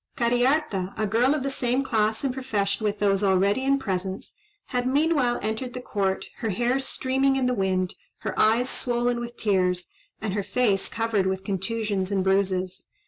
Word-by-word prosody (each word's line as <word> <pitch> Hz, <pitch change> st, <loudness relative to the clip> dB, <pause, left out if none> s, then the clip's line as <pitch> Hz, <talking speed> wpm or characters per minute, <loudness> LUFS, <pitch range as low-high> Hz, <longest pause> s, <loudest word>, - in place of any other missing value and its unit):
Cariharta, 240 Hz, -5 st, +1 dB
a 215 Hz, -, +1 dB
girl 240 Hz, +7 st, +3 dB
of 290 Hz, -, -2 dB
the 275 Hz, -, -1 dB
same 255 Hz, 0 st, 0 dB
class 220 Hz, -2 st, 0 dB
and 270 Hz, -2 st, 0 dB
profession 220 Hz, -6 st, -1 dB
with 210 Hz, -1 st, 0 dB
those 200 Hz, -1 st, +2 dB
already 200 Hz, +5 st, +3 dB
in 275 Hz, +1 st, +3 dB
presence, 190 Hz, -5 st, -3 dB, 0.4 s
had 250 Hz, -1 st, 0 dB
meanwhile 280 Hz, -3 st, +2 dB
entered 220 Hz, +4 st, -3 dB
the -, -, -3 dB
court, 195 Hz, -5 st, -1 dB
her 225 Hz, -, -2 dB
hair 240 Hz, +6 st, +1 dB
streaming 270 Hz, 0 st, +1 dB
in 265 Hz, -1 st, +1 dB
the 250 Hz, -, +2 dB
wind, 185 Hz, -4 st, 0 dB, 0.3 s
her -, -, -3 dB
eyes 230 Hz, +4 st, +3 dB
swollen 240 Hz, -1 st, -1 dB
with 240 Hz, 0 st, -6 dB
tears, 180 Hz, -4 st, +1 dB, 0.3 s
and 210 Hz, -3 st, -3 dB
her 205 Hz, -, 0 dB
face 200 Hz, -1 st, +1 dB
covered 225 Hz, -4 st, 0 dB
with 190 Hz, 0 st, -2 dB
contusions 200 Hz, 0 st, -2 dB
and 195 Hz, -2 st, +1 dB
bruises. 190 Hz, -1 st, 0 dB
220 Hz, 175 wpm, -25 LUFS, 195-250 Hz, 0.4 s, girl